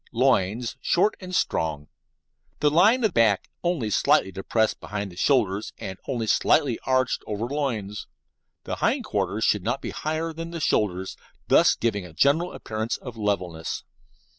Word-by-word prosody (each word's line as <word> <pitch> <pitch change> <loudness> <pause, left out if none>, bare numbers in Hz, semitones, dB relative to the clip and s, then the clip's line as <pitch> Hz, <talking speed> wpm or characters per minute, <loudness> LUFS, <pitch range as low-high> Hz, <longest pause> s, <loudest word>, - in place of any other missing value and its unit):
Loins 120 -2 +1
short 195 +5 +2
and 185 -1 -6
strong. 75 - -1 0.7
The 150 - +3
line 215 - +5
of 215 -5 +2
back 110 -4 +3 0.2
only 165 -12 0
slightly 95 - +3
depressed 110 +3 0
behind 100 -3 -5
shoulders 110 -7 +1
and 95 0 -7
only 120 -4 -1
slightly 130 +3 +2
arched 130 -1 +1
over 105 +2 -2
loins. 120 -7 -3 0.6
The - - -4
hind - - +1
quarters - - -1
should - - +3
not - - -1
be - - -5
higher 160 +1 -3
than 165 +1 -6
the 170 0 -5
shoulders, 95 - 0 0.3
thus - - +5
giving 105 -4 -1
a 90 -3 -11
general 145 - +2
appearance 110 +1 -3
of 125 -3 -9
levelness. 90 -7 -2
115 Hz, 150 wpm, -25 LUFS, 100-150 Hz, 0.7 s, line